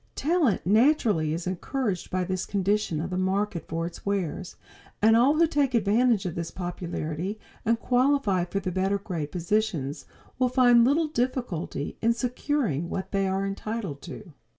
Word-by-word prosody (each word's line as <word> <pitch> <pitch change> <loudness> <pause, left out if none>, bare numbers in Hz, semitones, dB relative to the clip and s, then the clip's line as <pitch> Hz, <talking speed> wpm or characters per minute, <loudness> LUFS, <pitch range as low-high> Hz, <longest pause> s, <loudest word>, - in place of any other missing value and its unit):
Talent 310 - +1
naturally 215 - +3
is 165 +2 -3
encouraged 190 +2 -2
by 185 0 0
this 185 0 -3
condition 200 -4 0
of 175 +4 -4
the 180 - -1
market 190 -2 -1
for 165 +1 -2
its 170 - -8
wares, 190 -2 -2 0.4
and 220 +1 +5
all 255 +6 +5
who 335 +2 +5
take 285 -5 +1
advantage 225 0 +3
of 175 - -2
this 170 0 -4
popularity 175 +1 -4 0.3
and 230 +1 +2
qualify 245 -8 +2
for 195 +3 -2
the 185 -1 -3
better 190 +2 +1
grade 170 -7 -5
positions 175 -6 -1 0.3
will 255 -1 +3
find 245 -2 +5
little 305 +5 +3
difficulty 240 - -3
in 230 +1 +3
securing 240 - -1
what 190 - -4
they 195 -1 +1
are 190 +1 0
entitled 195 -6 -4
to. 185 -7 -10
200 Hz, 160 wpm, -26 LUFS, 175-240 Hz, 0.4 s, and